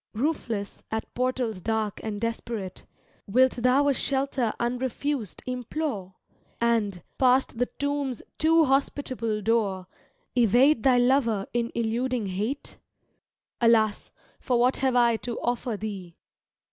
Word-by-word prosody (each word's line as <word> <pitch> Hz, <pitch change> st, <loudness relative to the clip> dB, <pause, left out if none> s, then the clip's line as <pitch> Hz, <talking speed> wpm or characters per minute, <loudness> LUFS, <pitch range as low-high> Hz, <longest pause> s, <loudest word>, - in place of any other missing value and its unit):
Roofless, 230 Hz, -6 st, -2 dB
at 220 Hz, 0 st, -4 dB
portals 250 Hz, -5 st, -1 dB
dark 220 Hz, 0 st, -1 dB
and 210 Hz, -2 st, -3 dB
desperate, 230 Hz, -4 st, -4 dB, 0.4 s
Wilt 255 Hz, +6 st, +3 dB
thou 255 Hz, +4 st, +3 dB
a 285 Hz, -, +4 dB
shelter 270 Hz, -3 st, 0 dB
unrefused 250 Hz, -1 st, -2 dB
implore. 250 Hz, -6 st, -4 dB, 0.4 s
And, 220 Hz, -6 st, +1 dB, 0.2 s
past 255 Hz, -2 st, +3 dB
the 245 Hz, -, +2 dB
tomb's 285 Hz, -4 st, -2 dB, 0.2 s
too^hospitable 275 Hz, -8 st, +1 dB
door. 205 Hz, -5 st, +1 dB, 0.5 s
Evade 245 Hz, +3 st, +4 dB
thy 255 Hz, 0 st, +4 dB
lover 245 Hz, -5 st, +2 dB
in 235 Hz, 0 st, 0 dB
eludii^ 235 Hz, -1 st, -1 dB
Hate? 215 Hz, +10 st, -4 dB, 0.8 s
Alas, 220 Hz, -3 st, +3 dB, 0.3 s
for 250 Hz, -, 0 dB
what 250 Hz, +2 st, +3 dB
have 260 Hz, -2 st, +1 dB
I 235 Hz, -2 st, +4 dB
to 225 Hz, +3 st, -5 dB
offer 240 Hz, -2 st, -2 dB
thee? 195 Hz, -5 st, -6 dB
235 Hz, 115 wpm, -26 LUFS, 220-260 Hz, 0.8 s, a